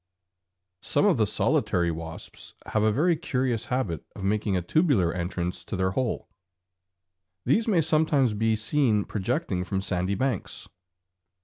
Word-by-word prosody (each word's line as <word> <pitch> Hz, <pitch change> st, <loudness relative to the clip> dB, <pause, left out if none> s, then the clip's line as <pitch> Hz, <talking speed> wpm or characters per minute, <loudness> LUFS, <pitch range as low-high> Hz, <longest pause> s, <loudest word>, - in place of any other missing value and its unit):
Some -, -, +1 dB
of -, -, +4 dB
the -, -, +2 dB
solitary 85 Hz, -1 st, +1 dB
wasps 80 Hz, 0 st, -8 dB
have 110 Hz, -, 0 dB
a 110 Hz, 0 st, +3 dB
very 165 Hz, +9 st, +2 dB
curious 130 Hz, -7 st, -1 dB
habit 105 Hz, -, -2 dB
of -, -, -7 dB
making 100 Hz, -1 st, +1 dB
a 90 Hz, -, -2 dB
tubular 115 Hz, -, +2 dB
entrance 90 Hz, 0 st, -3 dB
to -, -, -4 dB
their 95 Hz, 0 st, +1 dB
hole. 125 Hz, +3 st, -2 dB, 1.2 s
These 220 Hz, -, +2 dB
may 190 Hz, -7 st, +3 dB
sometimes 155 Hz, -6 st, +2 dB
be 110 Hz, +1 st, +1 dB
seen 110 Hz, -2 st, +1 dB
projecting 95 Hz, -2 st, -2 dB
from 95 Hz, +1 st, -2 dB
sandy 95 Hz, 0 st, -1 dB
banks. 130 Hz, -2 st, -2 dB
105 Hz, 140 wpm, -26 LUFS, 95-130 Hz, 1.2 s, of